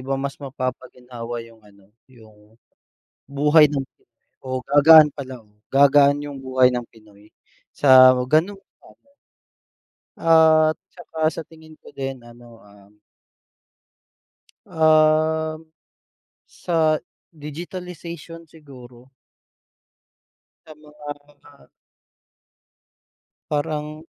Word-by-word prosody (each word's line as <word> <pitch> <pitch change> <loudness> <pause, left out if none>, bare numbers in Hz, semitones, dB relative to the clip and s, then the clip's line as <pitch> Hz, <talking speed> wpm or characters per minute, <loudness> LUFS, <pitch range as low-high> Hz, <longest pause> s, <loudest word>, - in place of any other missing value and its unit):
ba 135 - -1
mas 140 +1 -6
mapapaginhawa 125 -3 -7
yung 115 -1 -19
ano, 100 -1 -24 0.2
yung, 110 -3 -21 0.7
buhay 150 +2 +4
ng 140 -2 -3
Pinoy 130 -1 -10
gagaan 150 +2 +7
pala, 130 -2 -8
oo 105 - -31 0.2
gagaan 140 +1 +4
yung 140 -2 -9
buhay 130 -1 +2
ng 125 - -3
Pinoy 105 -2 -22 0.4
sa 130 -2 +6 0.2
ganun. 170 +8 0 1.6
At 160 -1 +4 0.2
tsaka 160 -2 -3
sa 160 0 -9
tingin 160 -1 -18
ko - - -18
din 135 -1 -6
ano, 120 -1 -17
ah 100 0 -21 1.8
Ah, 155 -1 +1 0.9
sa 160 -3 -1 0.4
digitalization 170 +1 -10
siguro. 130 -5 -17 1.6
Sa 155 - -13
mga 150 -1 -15 2.4
Parang 150 +1 -4
145 Hz, 85 wpm, -21 LUFS, 125-155 Hz, 2.4 s, gagaan